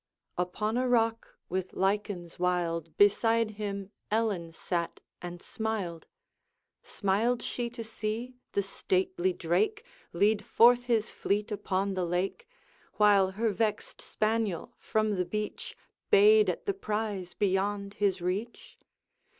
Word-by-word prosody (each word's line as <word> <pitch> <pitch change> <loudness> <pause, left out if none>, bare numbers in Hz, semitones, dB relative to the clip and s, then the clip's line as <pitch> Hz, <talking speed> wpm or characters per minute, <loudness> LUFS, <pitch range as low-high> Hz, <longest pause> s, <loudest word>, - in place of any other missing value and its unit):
Upon 210 +6 -1
a 255 0 +1
rock 230 -1 +1
with 185 +1 -3
lichens 190 -3 -1
wild, 170 -3 -1
Beside 225 +2 +4
him 200 -2 -5 0.2
Ellen 210 -7 0
sat 170 +1 -3 0.2
and 175 0 -7
smiled. 205 -7 -3 0.7
Smiled 220 +5 0
she 240 -1 -3
to 235 -1 -7
see 225 +3 -4 0.2
the 200 - +1
stately 375 - 0
drake 430 +4 0 0.3
Lead 205 +4 +2
forth 245 +1 +5
his 230 -3 +1
fleet 210 +2 -1
upon 195 -1 -1
the 185 -1 -1
lake, 185 - -2 0.5
While 205 -3 +5
her 220 +2 0
vexed 210 +1 -2
spaniel 215 -5 -1
from 215 -2 0
the 180 - +2
beach 210 +4 -5 0.3
Bayed 425 0 +6
at - - -3
the 400 - +1
prize 210 - -3
beyond 200 0 0
his 195 -3 0
reach? 195 +7 -4
210 Hz, 125 wpm, -29 LUFS, 190-230 Hz, 0.7 s, Bayed